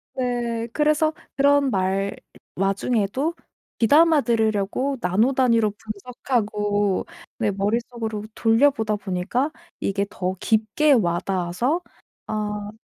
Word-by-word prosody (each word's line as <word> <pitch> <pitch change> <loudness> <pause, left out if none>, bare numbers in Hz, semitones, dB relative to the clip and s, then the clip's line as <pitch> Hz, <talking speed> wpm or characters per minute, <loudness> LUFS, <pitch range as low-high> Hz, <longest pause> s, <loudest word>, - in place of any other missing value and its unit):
네. 240 -2 -2
그래서 305 +1 +2 0.2
그런 285 0 +4
말 195 0 0 0.4
와중에도 205 - 0 0.4
귀담아들으려고 240 -3 +3
나노 210 +8 +2
단위로 230 -5 +3
분석하고 210 -2 -2 0.3
내 220 -3 +1
머릿속으로 220 +2 -2
돌려보다 225 -2 +2
보니까 200 +9 -1 0.3
이게 200 0 -1
더 185 -2 -3
깊게 225 +9 +2
와닿아서 185 - 0 0.5
아 210 -1 -3
220 Hz, 235 characters per minute, -23 LUFS, 200-255 Hz, 0.5 s, 그런